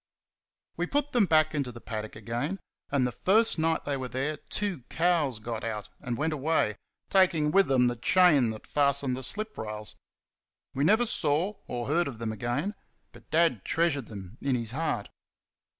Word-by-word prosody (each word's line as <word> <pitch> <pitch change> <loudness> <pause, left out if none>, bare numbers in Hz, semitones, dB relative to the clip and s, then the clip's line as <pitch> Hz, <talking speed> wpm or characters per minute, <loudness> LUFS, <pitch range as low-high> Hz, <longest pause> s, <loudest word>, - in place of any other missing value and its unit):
We - - -1
put 290 0 0
them 230 -6 +3
back 155 -1 +4
into 140 -4 -2
the 120 - -10
paddock 110 -2 -6
again, 120 - -3 0.3
and 140 -3 +2
the 125 - -1
first 200 - +4
night 160 0 +1
they 145 - -1
were 130 -1 -4
there 135 +5 -2
two 195 -2 -4
cows 165 -7 +1
got 110 +1 -5
out 110 -2 -4
and 125 -5 -4
went 155 +2 0
away, 145 -7 +1 0.4
taking 170 -6 +3
with 195 +2 +4
them 130 -2 +4
the 120 0 +1
chain 150 - +4
that 110 -1 -7
fastened 140 -2 +1
the 130 - -6
slip 215 - -1
rails. 105 -1 -5 0.8
We 135 - 0
never 220 +9 +4
saw 170 -2 +1
or 120 -1 -3
heard 165 +4 +1
of 130 -5 -6
them 115 -1 -3
again; 120 - -2 0.4
but - - -17
Dad 160 - +2
treasured 160 -7 0
them 100 +1 -10
in 135 -2 +1
his 115 -2 -3
heart. 160 +5 -2
140 Hz, 180 wpm, -28 LUFS, 120-165 Hz, 0.8 s, back